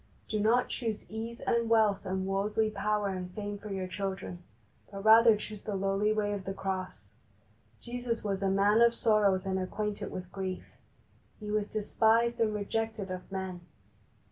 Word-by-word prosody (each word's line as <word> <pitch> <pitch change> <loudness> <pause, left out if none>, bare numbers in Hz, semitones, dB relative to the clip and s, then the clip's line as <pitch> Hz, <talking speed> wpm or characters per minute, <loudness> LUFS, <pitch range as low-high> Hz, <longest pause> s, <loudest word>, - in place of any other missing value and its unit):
Do 215 - -1
not 230 +4 +3
choose 225 -4 -3
ease 225 +2 -5
and 235 -1 +1
wealth 215 -3 +3
and 190 0 -1
worldly 210 +3 0
power 210 0 0
and 185 -1 -4
fame 205 -1 -4
for 210 - -8
your 190 -2 -3
children, 190 -1 -4 0.5
but 195 0 -7
rather 225 0 +8
choose 210 0 -7
the 210 - -4
lowly 195 +2 +1
way 210 -1 0
of 195 -2 -5
the 195 - -4
Cross. 190 -1 -4 0.7
Jesus 240 -1 -3
was 200 -2 -2
a 195 - +2
Man 200 +3 +4
of 235 0 +5
Sorrows 205 -5 +3
and 190 0 0
acquainted 205 +2 -3
with 185 -1 -7
grief. 190 -1 -5 0.7
He 210 -1 -5
was 210 -1 0
despised 225 +2 +2
and 225 -2 +3
rejected 210 -1 -2
of 185 +1 -7
men. 190 -2 -4
205 Hz, 170 wpm, -30 LUFS, 195-220 Hz, 0.7 s, rather